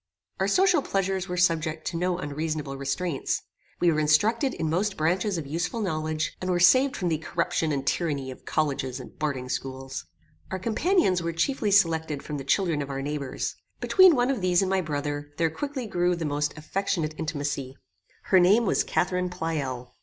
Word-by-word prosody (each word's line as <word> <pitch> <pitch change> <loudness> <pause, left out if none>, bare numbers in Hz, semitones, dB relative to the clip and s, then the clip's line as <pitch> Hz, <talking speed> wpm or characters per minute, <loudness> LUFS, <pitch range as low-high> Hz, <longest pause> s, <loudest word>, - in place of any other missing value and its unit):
Our - - +2
social 370 -4 +4
pleasures 195 -4 -1
were 180 - -3
subject 165 -3 +1
to 180 - -7
no 180 +1 0
unreasonable 150 -3 -3
restraints. 140 +3 -2 0.4
We 175 - +4
were 155 - +1
instructed 220 - +2
in 160 - -2
most 190 +5 0
branches 180 +5 +1
of 160 - -4
useful 170 +9 -2
knowledge, 155 -5 -2
and 185 - -2
were 180 -1 +2
saved 260 +10 +5
from 180 - -1
the 160 -2 0
corruption 160 0 -1
and 135 -2 -2
tyranny 140 -4 -1
of 130 - -12
colleges 140 -4 -1
and - - -11
boarding 140 -4 -2
schools. 135 +1 -5 0.4
Our 190 - -2
companions 230 - +2
were 170 0 -2
chiefly 215 - 0
selected 160 -7 +2
from 150 -2 -5
the - - -5
children 165 +1 +1
of 140 - -5
our 135 0 -3
neighbours. 145 -2 -3 0.2
Between 375 -4 +6
one 245 +1 +2
of 255 -7 -2
these 180 0 +3
and 190 - -1
my 190 -1 +2
brother, 145 -2 -4
there 165 -1 +1
quickly 275 - -4
grew 180 -4 +1
the 165 -1 -4
most 150 0 -1
affectionate 160 0 -2
intimacy. 145 -4 -3 0.5
Her 190 - +4
name 205 +7 +5
was - - +2
Catharine 180 0 0
Pleyel. 145 -8 -3
165 Hz, 185 wpm, -26 LUFS, 145-190 Hz, 0.5 s, Between